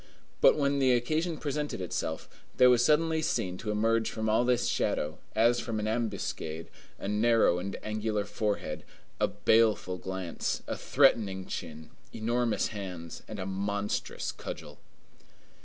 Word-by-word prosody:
But - - +6
when 140 -1 +1
the 130 -2 +4
occasion 155 +7 0
presented 150 -3 -3
itself, 85 -3 -3 0.3
there 125 0 +7
was 120 -1 +4
suddenly 160 +2 +3
seen 95 -11 -1
to 110 - -5
emerge 115 +2 +2
from 110 -1 -2
all 110 +3 +3
this 125 -1 +2
shadow, 75 +2 -1 0.2
as 120 +2 +4
from 115 -2 -3
an 105 - -2
ambuscade, 100 -8 -3 0.3
a - - -6
narrow 105 -3 +3
and 95 +2 -4
angular 105 -1 -1
forehead, 105 -9 -2 0.4
a - - +3
baleful 110 -5 +2
glance, 95 -2 -3
a - - -3
threatening 105 -9 +2
chin, 80 -1 -7 0.2
enormous 115 +1 0
hands, 90 -6 -7
and 110 - -6
a 95 - -4
monstrous 100 +2 -2
cudgel. 75 - -8
110 Hz, 140 wpm, -30 LUFS, 95-120 Hz, 0.4 s, there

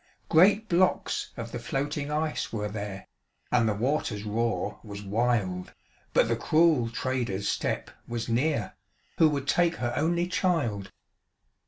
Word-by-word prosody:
Great 200 +6 +5
blocks 185 -1 +1
of 115 0 -5
the 120 - -4
floating 140 +4 -2
ice 150 +1 -1
were 105 -2 -2
there, 100 -2 -6 0.4
And 115 -3 +3
the 105 - 0
water's 115 -3 -1
roar 115 +2 -1
was 100 -2 -8
wild, 100 -4 0 0.4
But - - +4
the - - +1
cruel 155 -7 +3
trader's 120 -5 -2
step - - -1 0.2
was 120 -1 -3
near, 120 -2 0 0.5
Who 160 - +7
would 140 -2 -2
take 175 +1 +3
her 120 -4 -2
only 170 +4 +1
child. 165 - 0
120 Hz, 140 wpm, -28 LUFS, 105-155 Hz, 0.5 s, Who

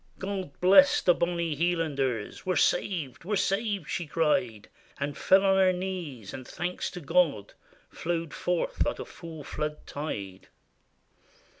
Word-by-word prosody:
God 190 -6 -5
bless 200 +11 +7
the 180 - +4
bonny 170 -2 -1
Hielanders! 145 -9 -1
We 185 - 0
're - - -1
saved! 155 - 0
we 205 +5 -3
're - - +3
saved!" 200 -4 0
she 170 +2 -3
cried; 135 -9 0 0.3
And 140 0 -2
fell 195 +1 +4
on 195 0 +4
her 190 -1 +5
knees; 180 - -5
and 130 -1 -8
thanks 180 +1 -3
to - - -6
God 150 - +1 0.4
Flowed 165 -2 -3
forth 180 -1 -1
like - - -1
a - - -6
full 160 -3 -10
flood 150 +2 -4
tide. 100 -11 -6
165 Hz, 150 wpm, -28 LUFS, 145-185 Hz, 0.4 s, bless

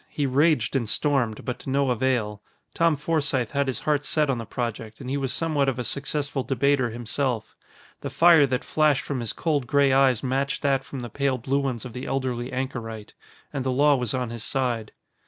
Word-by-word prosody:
He 145 - -2
raged 140 -2 +2
and 120 -5 0
stormed, 130 -7 0
but 125 -1 -3
to - - -7
no 135 -1 +2
avail. 115 -4 0 0.3
Tom 165 -2 +3
Forsythe 145 -5 0
had 140 -1 0
his 130 - -2
heart 150 -1 +1
set 150 -1 +1
on 125 - -2
the 115 - -6
project 115 -2 -4
and 130 -1 -6
he - - 0
was 135 -2 -1
somewhat 150 -4 +2
of 130 - -3
a 125 - -2
successful 140 +1 -2
debater 135 0 +1
himself. 120 +1 -3 0.4
The - - -5
fire 165 -4 +6
that 130 -1 -1
flashed 155 -3 +2
from 140 -3 -3
his 115 -2 -2
cold 145 -6 -1
gray 140 0 +3
eyes 135 -3 +3
matched 135 +3 -1
that 135 -1 +2
from 135 - -7
the 120 - -6
pale 140 0 0
blue 135 +3 0
ones 130 -4 -3
of 125 - -8
the 125 - -6
elderly 125 -2 -2
anchorite. 115 -5 -5 0.4
And 135 - -2
the 130 - -1
law 145 +3 +4
was 125 -2 -2
on 125 -2 -2
his 115 -1 -6
side. 120 -5 -1
130 Hz, 210 wpm, -25 LUFS, 120-140 Hz, 0.4 s, fire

